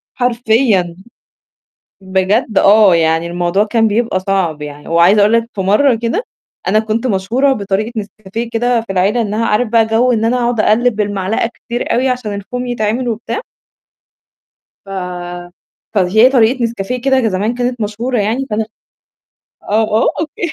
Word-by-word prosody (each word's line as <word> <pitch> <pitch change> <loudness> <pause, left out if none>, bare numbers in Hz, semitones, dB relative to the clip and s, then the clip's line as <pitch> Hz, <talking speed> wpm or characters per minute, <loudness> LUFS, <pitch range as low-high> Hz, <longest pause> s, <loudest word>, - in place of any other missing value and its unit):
حرفيًا. 230 -7 +1 1.1
بجد 190 +4 0
آه، 205 -2 +6
يعني 165 0 +1
الموضوع 175 +3 0
كان 225 0 +1
بيبقى 215 -3 0
صعب 185 -6 -1
يعني 145 0 -9
وعايزة 170 +5 +4
أقول 210 +2 +4
لك 230 0 +2
في 200 - -4
مرّة 210 +8 +3
كده 235 - -2 0.4
أنا 215 - +3
كنت 220 +2 -1
مشهورة 240 +6 +1
بطريقة 210 0 -2
نسكافيه 215 +2 -6
كده 240 +1 +1
في 225 -3 -6
العيلة 195 +5 +1
إنّها 220 +1 -1
عارف 215 +2 +1
بقى 225 -1 +3
جَو 235 +3 +2
إن 225 -2 0
أنا 235 +2 +2
أقعد 240 -2 0
أقلِّب 225 +2 +2
بالمعلقة 205 +2 -1
كتير 240 0 -4
أوي 255 +3 +1
عشان 250 -4 -2
الفوم 245 +5 -5
يتعمل 240 +1 -1
وبتاع. 230 - -3 1.5
ف - - -14 1.0
فهي 210 +5 +4
طريقة 250 -1 +2
نسكافيه 235 +2 -3
كده 265 0 +2
ج 250 - 0
زمان 205 +4 -1
كانت 245 -1 -2
مشهورة 230 +5 -2
يعني، 225 +6 -1
فأنا 215 +1 -1 1.0
آه، 215 +2 +1 0.2
آه - - +3
أوكي 320 +1 -4
220 Hz, 150 wpm, -15 LUFS, 195-245 Hz, 1.5 s, آه